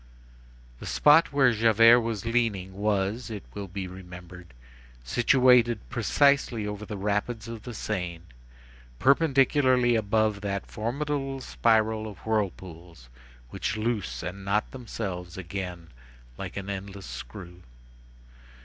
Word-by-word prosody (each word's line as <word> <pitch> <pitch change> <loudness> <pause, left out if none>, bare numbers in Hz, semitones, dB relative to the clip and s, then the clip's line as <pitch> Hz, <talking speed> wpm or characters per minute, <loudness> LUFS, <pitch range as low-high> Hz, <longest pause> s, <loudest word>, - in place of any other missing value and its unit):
The - - -8
spot 150 +3 +5
where 135 -4 +4
Javert 115 +2 +6
was 115 -3 -3
leaning 115 -6 0
was, 105 +3 -1
it 105 -3 -6
will 100 -1 -6
be 95 0 -5
remembered, 90 -3 -11 0.5
situated 120 - +4
precisely 140 -6 +2
over 105 0 -5
the 105 - -5
rapids 105 +3 -2
of 115 -1 -7
the 120 - -8
Seine, 90 -6 -4 0.7
perpendicularly 135 - +3
above 110 -1 +1
that 100 -1 -3
formidable 135 +4 -3
spiral 110 -3 +1
of 105 -4 -9
whirlpools 90 - -4 0.4
which - - -3
loose 110 - -2
and 95 +2 -6
knot 100 +2 0
themselves 95 -8 -6
again 90 -2 -6 0.5
like - - -7
an 100 -1 -5
endless 100 0 -6
screw. 65 +9 -9
105 Hz, 115 wpm, -27 LUFS, 95-120 Hz, 0.7 s, Javert